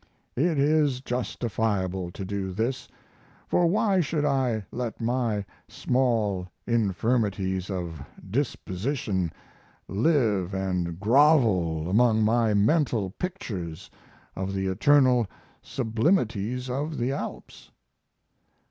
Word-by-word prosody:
It 160 +4 +1
is 145 -2 +3
justifiable 110 -7 -2
to 95 - -6
do 95 -1 -3
this; 115 +6 -2 0.6
for 175 - +3
why 200 +1 +2
should 150 -1 -1
I 130 -7 0
let 120 -2 -4
my 115 -3 0 0.2
small 110 -8 0 0.2
infirmities 100 -4 0
of 85 -6 -4 0.3
disposition 100 - -2 0.6
live 105 - +1
and 90 -3 -2
grovel 105 - +3
among 110 +3 +3
my 110 -1 +3
mental 110 - +2
pictures 95 - -5 0.4
of 95 +1 -3
the 95 0 -1
eternal 125 +4 +4 0.3
sublimities 120 - 0
of 145 +5 -3
the 120 +3 0
Alps? 140 - -7
115 Hz, 95 wpm, -26 LUFS, 95-130 Hz, 0.6 s, eternal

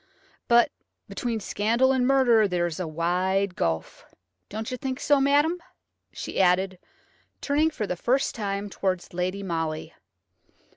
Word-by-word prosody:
But 235 0 +5 0.4
between 235 -3 -3
scandal 230 +6 +1
and 255 -2 +2
murder 245 -6 +4
there 175 -2 0
is 170 -1 -4
a 180 - -2
wide 180 +4 0
gulf. 80 -1 -2 0.5
Don't 220 +4 -5
you - - -2
think 260 +2 -4
so, 285 -2 +3
madam," 290 +5 +3 0.5
she - - -3
added, 185 0 +2 0.6
turning 295 +3 +2
for 265 -9 -4
the 180 - -3
first 255 +9 +1
time 200 -2 -3
towards 190 -3 -3
Lady 185 +3 -2
Molly. 165 -4 -3
200 Hz, 140 wpm, -26 LUFS, 180-260 Hz, 0.6 s, But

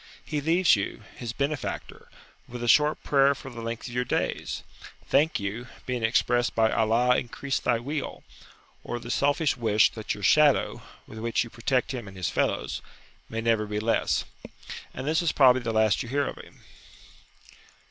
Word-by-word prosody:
He 150 -2 -2
leaves 165 +2 +4
you, 100 +1 -4
his 120 -2 -5
benefactor, 140 +4 -4 0.4
with 120 0 -7
a - - -2
short 150 +6 +4
prayer 140 0 +4
for 135 - -10
the 120 -1 -8
length 115 +1 -5
of 120 - -8
your 125 0 0
days. - - -2 0.4
"Thank 150 +4 +2
you," 105 +5 -4 0.2
being 125 -2 -2
expressed 120 +1 +1
by 110 -1 +3
"Allah 115 +3 +3
increase 135 +3 -3
thy 120 - +1
weal!" 140 +4 -5 0.6
or 120 - -4
the 120 0 -6
selfish 145 +3 +2
wish 110 -2 +3
that 110 -1 -4
your 100 - -10
shadow 150 +7 +4 0.2
(with 110 - -10
which 115 +1 0
you 115 - -11
protect 125 +2 0
him 120 -5 -5
and 95 -1 -11
his 90 - -2
fellows) - - -1 0.5
may 115 0 -3
never 115 -2 +1
be 105 0 -2
less. 115 +2 +1 0.7
And 130 - -6
this 160 +4 +2
is 170 - +1
probably 130 -2 +5
the 115 -1 -2
last 110 -1 +2
you 120 - -6
hear 140 +2 +1
of - - -6
him. - - -18
120 Hz, 180 wpm, -26 LUFS, 115-140 Hz, 0.7 s, probably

